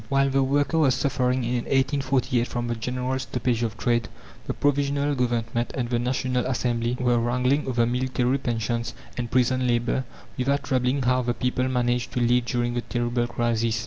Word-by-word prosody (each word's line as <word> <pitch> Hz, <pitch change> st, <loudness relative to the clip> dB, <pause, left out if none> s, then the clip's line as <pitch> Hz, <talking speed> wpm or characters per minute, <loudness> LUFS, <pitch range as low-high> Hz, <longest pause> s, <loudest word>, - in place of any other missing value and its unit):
While 135 Hz, 0 st, +2 dB
the 135 Hz, 0 st, +3 dB
worker 145 Hz, +4 st, +1 dB
was 135 Hz, -5 st, +4 dB
suffering 130 Hz, -2 st, 0 dB
in 120 Hz, 0 st, -1 dB
1848 130 Hz, -3 st, +1 dB
from 120 Hz, 0 st, -3 dB
the 120 Hz, -, -1 dB
general 125 Hz, +3 st, -2 dB
stoppage 125 Hz, -2 st, -1 dB
of 115 Hz, -2 st, -2 dB
trade, 120 Hz, -1 st, +1 dB, 0.4 s
the -, -, -1 dB
Provisional 145 Hz, 0 st, +1 dB
Government 120 Hz, -2 st, -1 dB
and 120 Hz, -2 st, -2 dB
the 120 Hz, -, +2 dB
National 125 Hz, 0 st, 0 dB
Assembly 120 Hz, -1 st, -1 dB
were 120 Hz, -1 st, +2 dB
wrangling 125 Hz, +5 st, +1 dB
over 120 Hz, -2 st, +2 dB
military 125 Hz, +2 st, 0 dB
pensions 115 Hz, -1 st, -2 dB, 0.2 s
and 120 Hz, -1 st, -3 dB
prison 130 Hz, +1 st, +2 dB
labour, 120 Hz, +2 st, +1 dB, 0.4 s
without 140 Hz, +2 st, +1 dB
troubling 130 Hz, 0 st, +1 dB
how 125 Hz, +1 st, +2 dB
the 120 Hz, -1 st, -1 dB
people 125 Hz, +1 st, 0 dB
managed 125 Hz, -1 st, 0 dB
to -, -, 0 dB
live 120 Hz, 0 st, +3 dB
during 120 Hz, -1 st, -1 dB
the 120 Hz, -, -1 dB
terrible 120 Hz, 0 st, -1 dB
crisis. 115 Hz, -2 st, 0 dB
125 Hz, 175 wpm, -25 LUFS, 120-130 Hz, 0.4 s, was